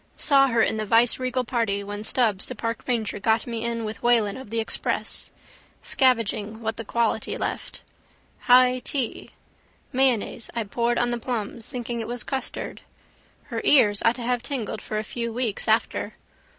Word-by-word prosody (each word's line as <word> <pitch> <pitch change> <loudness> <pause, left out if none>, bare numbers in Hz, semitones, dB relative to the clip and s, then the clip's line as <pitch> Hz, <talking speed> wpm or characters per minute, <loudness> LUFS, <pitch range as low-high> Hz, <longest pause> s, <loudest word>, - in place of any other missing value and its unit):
Saw 275 -2 +5
her 230 -3 +3
in 220 - +1
the 215 - -2
viceregal 250 +3 +3
party 230 -5 -1
when 205 +1 -6
Stubbs 220 -4 +2
the 255 - -3
park 230 0 -3
ranger 225 -4 -1
got 220 +2 +2
me 230 -2 -4
in 230 -1 -2
with 215 +1 -6
Whelan 230 -4 +3
of 260 -4 -9
the 230 +1 -1
Express. 220 - -1 0.5
Scavenging 225 -4 +1
what 225 -1 -3
the 230 - -4
quality 230 0 -1
left. - - -4 0.6
High 250 0 +5
tea. 255 -2 -3 0.6
Mayonnaise 250 -3 +1
I 230 - 0
poured 235 +3 0
on 240 0 +1
the 240 - -2
plums 230 -2 -3
thinking 240 -2 -4
it 225 - -3
was 240 -1 -4
custard. 270 -1 -4 0.7
Her - - -1
ears 205 -8 +5
ought 230 - +4
to 245 - -6
have 245 0 0
tingled 230 -6 -4
for 215 - -4
a 215 - -1
few 235 +1 -4
weeks 230 -3 -2
after. - - +1
235 Hz, 170 wpm, -25 LUFS, 220-250 Hz, 0.7 s, Saw